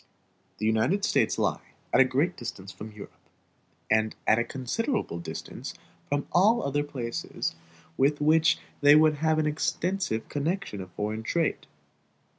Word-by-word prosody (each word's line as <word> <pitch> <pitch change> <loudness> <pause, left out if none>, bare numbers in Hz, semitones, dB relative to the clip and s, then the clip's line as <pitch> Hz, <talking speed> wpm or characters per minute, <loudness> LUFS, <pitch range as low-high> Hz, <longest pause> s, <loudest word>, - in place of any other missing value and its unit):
The 110 - -3
United 110 - +2
States - - +2
lie - - 0 0.3
at - - +5
a - - +9
great 140 +8 +1
distance 100 -5 -7
from 110 +1 -9
Europe, 105 -1 -11 0.8
and 110 0 +2
at 110 - +4
a - - +2
considerable 140 - -2
distance 85 - -7 0.3
from 145 0 0
all 215 +7 +4
other 145 +1 0
places 125 -5 -4 0.4
with 145 +2 +3
which 160 +2 +4 0.2
they 145 +1 +8
would 155 -1 +5
have 160 +1 +2
extensive 160 -3 -1
connections 150 - -2
of 95 -1 -10
foreign 105 +2 -3
trade. 160 +8 -1
145 Hz, 140 wpm, -27 LUFS, 110-160 Hz, 0.8 s, a